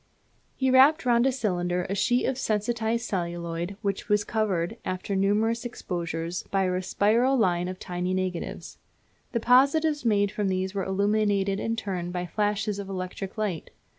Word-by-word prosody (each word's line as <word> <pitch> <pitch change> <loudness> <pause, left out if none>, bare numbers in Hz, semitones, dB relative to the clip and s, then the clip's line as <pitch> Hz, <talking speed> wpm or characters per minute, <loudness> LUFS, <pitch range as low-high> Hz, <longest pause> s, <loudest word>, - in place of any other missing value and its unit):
He 260 -1 +1
wrapped 275 +4 +6
round 240 +1 +4
a - - +3
cylinder 180 -7 -1
a 195 - -2
sheet 245 +5 +2
of 265 - 0
sensitized 225 +1 -1
celluloid 170 0 -3
which 200 +1 -2
was 210 0 +3
covered, 200 -7 -1
after 185 +2 -3
numerous 215 +4 +1
exposures, 175 -6 -4
by 195 -1 +1
a 185 0 0
spiral 230 +8 +2
line 180 -6 +2
of 185 0 -5
tiny 180 +1 -3
negatives. 185 -2 -4 0.5
The 235 - 0
positives 280 +5 +3
made 205 -3 +2
from 210 -1 -1
these 190 0 -1
were 195 -2 -2
illuminated 200 0 +1
in 225 +1 -1
turn 190 -6 -3
by 180 0 -3
flashes 205 +2 -1
of 195 -1 -6
electric 185 +2 -5
light. 200 -7 -2
200 Hz, 160 wpm, -26 LUFS, 185-225 Hz, 0.5 s, wrapped